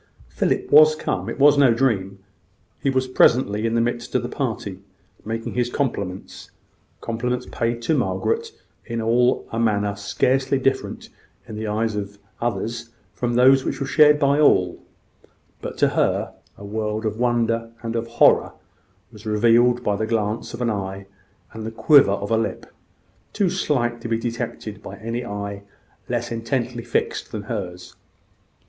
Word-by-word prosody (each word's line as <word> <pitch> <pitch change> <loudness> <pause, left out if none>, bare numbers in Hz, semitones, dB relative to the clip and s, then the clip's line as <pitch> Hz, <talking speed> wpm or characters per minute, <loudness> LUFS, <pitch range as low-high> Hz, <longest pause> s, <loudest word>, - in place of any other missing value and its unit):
Philip - - -1
was 155 +1 +8
come - - -3
it - - -5
was 145 +1 +5
no 130 -5 +5
dream. 100 -6 0 0.6
He 140 - +1
was 130 -1 0
presently 115 -4 +3
in 115 - -1
the 115 - +3
midst 120 +1 -3
of 125 - +2
the 120 - -4
party, 110 -8 -4 0.4
making 115 +1 -4
his 120 -1 0
compliments 100 -9 -4 0.5
compliments 125 +2 -2
paid 115 0 -2
to 155 +7 +1
Margaret 455 - -1 0.3
in 115 -2 -4
a 115 0 +1
manner 105 -3 +1
scarcely 130 +6 +1
different 135 0 -2 0.4
in 110 - -7
the 110 0 -4
eyes 110 +1 -1
of 100 0 -5 0.2
others 115 +1 -3 0.2
from 120 -1 -2
those 130 +2 +6
which - - -3
were 140 - -2
shared 150 +1 +5
by 140 0 +2
all: 90 -12 +3 0.8
but - - -6
to - - +3
her, - - 0 0.2
a 100 - -10
world 110 +1 -3
of 110 +1 -2
wonder 115 -1 +1
and 115 0 -3
of 115 0 -2
horror 115 - +4 0.6
was 105 +1 -12
revealed 120 +3 +3
by 105 - +1
the 110 +2 -2
glance 110 -1 -1
of 120 - -8
the - - +1
eye 100 -1 -5 0.5
and 110 0 -7
the 110 - -3
quiver 140 +3 +5
of 100 0 -4
the 115 - +2
lip, 115 - -3 0.7
too 195 -4 +1
slight 120 -10 -1
to 115 - -5
be 115 - +1
detected 115 -3 -5
by - - -9
any 115 +3 -4
eye 100 -2 -5 0.5
less 120 -1 -2
intently 115 +1 -2
fixed 120 - -2
than 105 -2 -5
hers. 95 -5 -6
115 Hz, 160 wpm, -22 LUFS, 105-125 Hz, 0.8 s, was